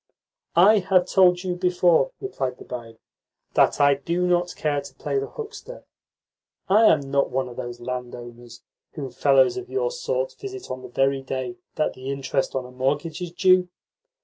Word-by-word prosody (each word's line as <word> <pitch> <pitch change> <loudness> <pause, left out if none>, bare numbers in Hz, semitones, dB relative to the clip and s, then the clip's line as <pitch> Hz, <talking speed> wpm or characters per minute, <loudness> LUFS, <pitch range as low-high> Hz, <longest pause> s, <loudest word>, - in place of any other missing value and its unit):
"I 205 +5 +6
have 185 -1 +2
told 180 -1 +4
you 185 -1 -1
before," 180 - +3
replied 130 - -4
the - - -11
barin, 115 -2 -8 0.6
"that - - +3
I 140 0 +6
do 170 +6 -1
not 175 0 +1
care 145 -2 -1
to 140 -1 -12
play 140 0 -2
the 135 - -4
huckster. 455 +3 -9 0.8
I 210 +4 +5
am 155 -8 +5
not 140 0 +2
one 130 0 -1
of 120 - -10
those 120 0 -6
landowners 120 -1 -8 0.3
whom 135 -4 -6
fellows 135 - +3
of 375 0 -6
your 480 +4 -1
sort - - -2
visit 390 -1 -7
on 130 - -5
the 125 - -10
very 135 +2 +1
day 130 -2 -4 0.2
that 155 - 0
the 130 +1 -8
interest 135 -1 -2
on 130 -1 -2
a 125 - -11
mortgage 145 +6 -2
is 175 -2 -4
due. 185 0 +3
145 Hz, 175 wpm, -24 LUFS, 130-185 Hz, 0.8 s, I